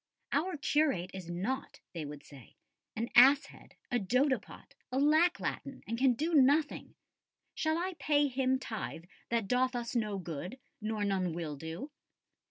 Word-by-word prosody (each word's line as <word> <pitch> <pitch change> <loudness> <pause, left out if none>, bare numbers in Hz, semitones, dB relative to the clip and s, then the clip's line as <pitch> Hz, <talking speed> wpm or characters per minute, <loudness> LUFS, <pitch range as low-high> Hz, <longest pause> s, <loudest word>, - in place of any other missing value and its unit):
"Our 315 +4 0
curate 280 - +1
is 185 -3 -7
naught," 200 +10 -3
they 165 -3 -4
would 145 0 -8
say, 135 -7 -15 0.4
"an 230 +2 -3
ass 275 +4 +8
head, - - -16 0.2
a 245 - +2
dodipot 255 +7 -1
[?], - - -57
a 255 - -1
lack 310 +5 +4
latin, 275 - -4
and 230 - -3
can 255 +1 +4
do 320 +7 -1
nothing. 290 +1 +3 0.6
Shall 315 0 0
I 370 +2 -2
pay 290 -1 +3
him 260 0 +1
tithe 220 -9 -5 0.3
that 230 -3 0
doth 255 +3 +2
us 240 0 -3
no 210 -4 0
good, 180 - -6 0.2
nor 215 -1 -1
none 185 -4 0
will 160 -3 -4
do?" 160 - -7
245 Hz, 165 wpm, -32 LUFS, 190-285 Hz, 0.6 s, ass